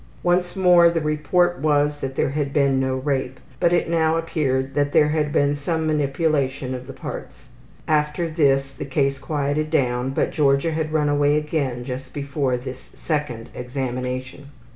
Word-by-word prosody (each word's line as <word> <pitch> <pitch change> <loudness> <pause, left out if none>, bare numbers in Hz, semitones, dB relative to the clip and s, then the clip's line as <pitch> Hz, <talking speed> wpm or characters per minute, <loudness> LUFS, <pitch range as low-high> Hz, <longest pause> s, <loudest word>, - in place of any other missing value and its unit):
Once 175 +1 +1
more 180 -2 +6
the 170 0 0
report 155 +4 +1
was 145 0 +1
that 135 -1 -4
there 135 - 0
had 145 -1 -2
been 140 -2 +2
no 130 0 0
rape, 130 -1 -2 0.2
but 170 - +3
it 175 - +2
now 165 -1 +2
appeared 135 -5 -1
that 145 0 0
there 150 - +5
had 150 -1 0
been 145 0 +2
some 160 +2 -2
manipulation 140 -3 0
of 125 0 -7
the - - -6
parts. - - -8 0.4
After 150 +2 +1
this 135 -4 +1
the - - -6
case 135 0 0
quieted 145 +1 -1
down, 125 -4 +1
but 135 - 0
Georgia 140 +2 +2
had 155 -1 -2
run 155 -1 +1
away 145 0 +3
again 145 -5 -2
just 130 +1 -7
before 140 -2 -1
this 130 +1 -9
second 145 -8 -3
examination. 130 +1 -4
145 Hz, 165 wpm, -22 LUFS, 135-155 Hz, 0.4 s, more